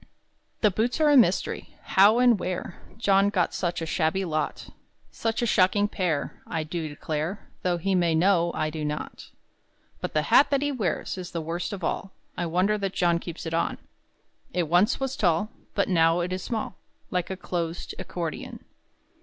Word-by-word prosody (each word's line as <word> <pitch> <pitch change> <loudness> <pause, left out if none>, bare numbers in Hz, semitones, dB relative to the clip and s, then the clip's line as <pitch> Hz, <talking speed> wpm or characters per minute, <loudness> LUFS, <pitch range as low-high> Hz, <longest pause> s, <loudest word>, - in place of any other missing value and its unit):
The 210 - +4
boots 225 - 0
are 305 -1 +5
a - - +6
mystery: 210 -8 +2
How 205 +4 +5
and 245 -4 +5
where 180 -1 -4 0.2
John 200 -3 +3
got 185 -4 0
such 175 -2 -2
a - - -2
shabby 170 +4 0
lot, 155 -3 -3 0.4
Such 225 +1 -1
a - - +3
shocking 205 -1 +3
pair, 175 -8 -2
I 160 -2 -2
do 160 +1 -4
declare 155 +6 -4
Though 180 -1 +1
he 195 +3 -1
may 170 -3 +2
know, 170 0 +3
I 155 - -1
do 155 -1 -4
not. 150 0 -5 0.7
But - - -5
the 155 - +3
hat 280 - +5
that 280 0 +1
he 290 - 0
wears 195 - -2
Is 180 -1 -6
the 170 - -4
worst 165 +3 -3
of 195 -3 -6
all; 190 +3 -2 0.2
I 175 - -2
wonder 185 +5 +1
that 195 -1 -2
John 170 -1 +2
keeps 170 0 -7
it 165 - -4
on. 165 - 0 0.8
It 175 -3 +1
once 180 +8 +3
was 270 -1 -2
tall, 180 +3 +1 0.2
But 200 - +2
now 165 -1 +3
it 180 +1 -2
is 185 - -3
small 220 -4 -4 0.3
Like 180 -1 -1
a 190 - -4
closed 170 -2 -4
accordeon. 170 -4 -5
180 Hz, 185 wpm, -26 LUFS, 165-205 Hz, 0.8 s, a